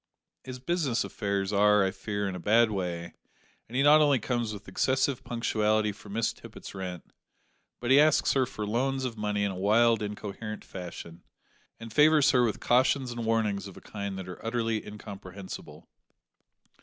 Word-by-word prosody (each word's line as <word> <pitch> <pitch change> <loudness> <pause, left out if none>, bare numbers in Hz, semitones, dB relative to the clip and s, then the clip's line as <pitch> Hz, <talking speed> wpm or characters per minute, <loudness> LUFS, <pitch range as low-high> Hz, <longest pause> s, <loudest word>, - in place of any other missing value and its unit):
His 130 -1 -7
business 130 -3 0
affairs 100 -1 -2
are, 105 0 +5
I 95 - 0
fear, 100 0 -3
in 95 - -3
a 90 - -5
bad 110 +4 +4
way, 90 -4 -4 0.6
and 120 - -9
he 135 - +3
not 150 +1 +7
only 145 -3 +4
comes 120 -1 -2
with 105 -1 -9
excessive 130 +6 0
punctuality 110 -2 +1
for 100 - -14
Miss 110 +3 0
Tippet's - - -11
rent, 90 -3 -7 0.7
but 120 +1 -1
he 135 - +8
asks 155 0 +4
her 130 -2 +2
for 105 - -5
loans 130 +5 -1
of 120 -3 -3
money 105 -1 -1
in 100 - 0
a - - -6
wild 110 +4 +3
incoherent 105 +1 -6
fashion, 85 -2 -9 0.6
and 115 -1 -9
favours 150 -1 +5
her 125 -2 +4
with 115 -3 0
cautions 130 +1 +2
and 120 -1 -4
warnings 105 -3 0
of 95 - -12
a - - -9
kind 100 -2 -6
that 95 -1 -7
are 90 - -9
utterly 115 -1 -1
incomprehensible. 100 -2 -9
110 Hz, 175 wpm, -28 LUFS, 100-125 Hz, 0.7 s, he